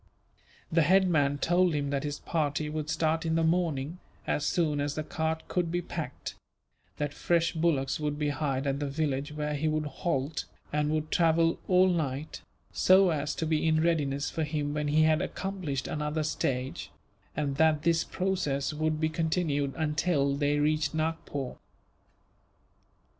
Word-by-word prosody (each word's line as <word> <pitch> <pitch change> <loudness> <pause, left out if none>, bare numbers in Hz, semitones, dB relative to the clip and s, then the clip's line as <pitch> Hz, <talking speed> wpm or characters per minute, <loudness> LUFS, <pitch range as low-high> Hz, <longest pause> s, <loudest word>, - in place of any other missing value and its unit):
The 165 0 +4
head 190 +5 +4
man 145 -4 +2
told 175 +2 +2
him 140 -1 -1
that 140 -1 0
his 145 -1 -3
party 150 -2 -1
would 155 0 -3
start 160 0 +1
in 160 -1 0
the 165 - +2
morning, 165 -2 0 0.3
as 150 - 0
soon 150 -4 +1
as 145 0 -2
the 155 - -2
cart 160 +1 -2
could 175 -2 -1
be 175 - 0
packed; - - -5 0.6
that 145 -1 -2
fresh 170 +1 +1
bullocks 155 -5 +1
would 150 -1 -2
be 150 -1 0
hired 140 -1 -1
at 140 0 0
the 145 - -2
village 145 0 -1
where 150 0 -2
he 150 +2 -1
would 155 0 0
halt, 145 0 -2 0.3
and 150 0 +1
would 155 0 -1
travel 165 0 +3
all 185 0 +5
night, 155 -5 -2 0.3
so 185 -1 +5
as 150 -1 -1
to 160 - -2
be 155 0 +1
in 155 0 +3
readiness 145 -4 0
for 160 - -1
him 150 -1 -2
when 150 0 -1
he 155 +2 +4
had 155 0 +3
accomplished 185 -9 -3
another 150 +1 -2
stage; 130 -3 -2 0.5
and 140 -2 -1
that 155 -1 +3
this 165 0 +3
process 170 -7 -1
would 155 0 -1
be 155 - +2
continued 155 -3 0
until 150 -2 +1
they 145 0 +1
reached 150 +1 +1
Nagpore. 155 -4 -3
155 Hz, 165 wpm, -29 LUFS, 145-165 Hz, 0.6 s, all